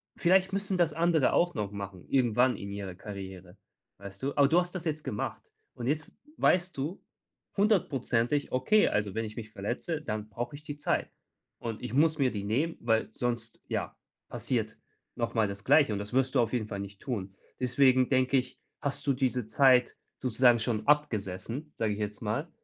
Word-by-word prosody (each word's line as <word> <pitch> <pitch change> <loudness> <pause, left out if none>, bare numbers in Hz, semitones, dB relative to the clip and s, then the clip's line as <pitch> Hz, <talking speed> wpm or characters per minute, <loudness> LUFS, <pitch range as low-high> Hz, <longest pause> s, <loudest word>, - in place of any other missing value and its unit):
vielleicht 190 +2 +3
müssen 195 -1 -1
das 170 -4 +2
andere 165 -3 +3
auch 175 0 +3
noch 105 -1 -2
machen, 100 -3 -7
irgendwann 125 -1 +3
in 100 0 -7
ihrer 100 -3 -5
Karriere, 95 -2 -9 0.4
weißt 100 +4 -10
du? 140 - -1
Aber 140 -1 +6
du 170 +4 +4
hast 175 +1 -2
das 180 -2 -4
jetzt 155 -1 -2
gemacht 105 - -4 0.2
und 120 - -5
jetzt 150 +1 -1 0.3
weißt 185 +1 +2
du 150 +8 -4 0.5
hundertprozentig: 145 - +1
„Oay, 170 +12 +4
also 105 -2 0
wenn 115 0 -1
ich 105 0 -8
mich 110 -2 -7
verletze, 120 - -3
dann 110 -1 -4
brauche 120 +6 -5
ich 145 - -12
die 145 -1 -6
Zeit 150 - -1 0.5
und 115 -2 -5
ich 125 - -5
muss 155 +3 +3
mir 135 -4 +2
die 100 -2 -4
nehmen, 140 +11 0
weil 115 -1 +1
sonst 120 -2 -3
ja, - - -3 0.3
passiert - - -2 0.4
noch 115 -1 -2
mal 110 -2 +3
das 100 0 -7
Gleiche.“ 145 -4 +5
Und 100 - -2
das 105 +3 -7
wirst 130 +1 +2
du - - +5
auf 115 - -1
jeden 115 -4 -1
Fall 100 -2 -5
nicht 100 0 -8
tun. 100 -7 -4 0.2
Deswegen 130 0 +4
denke 130 0 +3
ich, 125 0 -3 0.2
hast 145 -1 -3
du 140 - +4
diese 125 -2 0
Zeit 125 0 +4 0.2
sozusagen 125 -1 +4
schon 110 -1 -1
abgesessen, 125 0 0
sage 110 -2 0
ich 105 - -6
jetzt 105 0 -3
mal. 115 +10 -2
125 Hz, 190 wpm, -29 LUFS, 105-145 Hz, 0.5 s, Aber